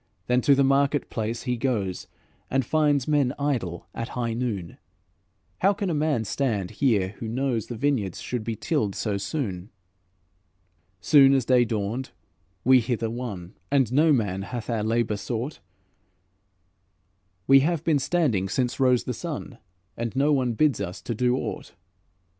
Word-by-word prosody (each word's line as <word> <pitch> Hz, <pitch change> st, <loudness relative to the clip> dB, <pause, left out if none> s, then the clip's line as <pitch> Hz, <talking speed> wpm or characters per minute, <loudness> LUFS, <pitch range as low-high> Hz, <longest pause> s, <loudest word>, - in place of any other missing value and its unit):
Then 125 Hz, +1 st, +2 dB
to 140 Hz, +3 st, +5 dB
the 140 Hz, -, +3 dB
market 140 Hz, +1 st, +2 dB
place 115 Hz, +1 st, -3 dB
he 125 Hz, -2 st, -1 dB
goes, 110 Hz, -8 st, -2 dB, 0.4 s
And 135 Hz, -1 st, +1 dB
finds 145 Hz, -2 st, +2 dB
men 145 Hz, -4 st, +2 dB
idle 115 Hz, -13 st, -2 dB
at 115 Hz, -, -5 dB
high 120 Hz, -2 st, -1 dB
noon: 110 Hz, -8 st, -4 dB, 0.8 s
'How 195 Hz, +2 st, +4 dB
can 200 Hz, -3 st, -2 dB
a -, -, 0 dB
man 150 Hz, -7 st, 0 dB
stand 105 Hz, -6 st, -1 dB
here 105 Hz, -9 st, +1 dB
who 115 Hz, -, -5 dB
knows 120 Hz, -1 st, -1 dB
The 120 Hz, -, -5 dB
vineyards 115 Hz, -7 st, -1 dB
should 125 Hz, -3 st, -4 dB
be 115 Hz, 0 st, -3 dB
tilled 110 Hz, -, -1 dB
so 105 Hz, -3 st, -1 dB
soon?'" 100 Hz, -, -4 dB, 1.3 s
"'Soon 135 Hz, +6 st, +6 dB
as 130 Hz, -3 st, +1 dB
day 125 Hz, -1 st, +4 dB
dawned 110 Hz, +3 st, -3 dB, 0.5 s
we 130 Hz, 0 st, +6 dB
hither 115 Hz, -2 st, -2 dB
won, 105 Hz, -7 st, -6 dB, 0.2 s
And 135 Hz, -4 st, +2 dB
no 155 Hz, +3 st, +4 dB
man 100 Hz, -8 st, +1 dB
hath 120 Hz, +3 st, -5 dB
our 115 Hz, -2 st, 0 dB
labour 110 Hz, -1 st, 0 dB
sought; 120 Hz, +7 st, -4 dB, 1.9 s
We 135 Hz, 0 st, +7 dB
have 160 Hz, +2 st, 0 dB
been 155 Hz, -4 st, +2 dB
standing 135 Hz, -, +1 dB
since 125 Hz, +3 st, -1 dB
rose 125 Hz, -2 st, +3 dB
the 125 Hz, -, -3 dB
sun 145 Hz, -6 st, -6 dB, 0.4 s
And 115 Hz, 0 st, -4 dB
no 145 Hz, +3 st, +3 dB
one 130 Hz, -4 st, +1 dB
bids 145 Hz, 0 st, +2 dB
us 95 Hz, 0 st, -5 dB
to 120 Hz, -, -3 dB
do 125 Hz, +3 st, +1 dB
aught.' -, -, -5 dB
125 Hz, 160 wpm, -25 LUFS, 110-140 Hz, 1.9 s, We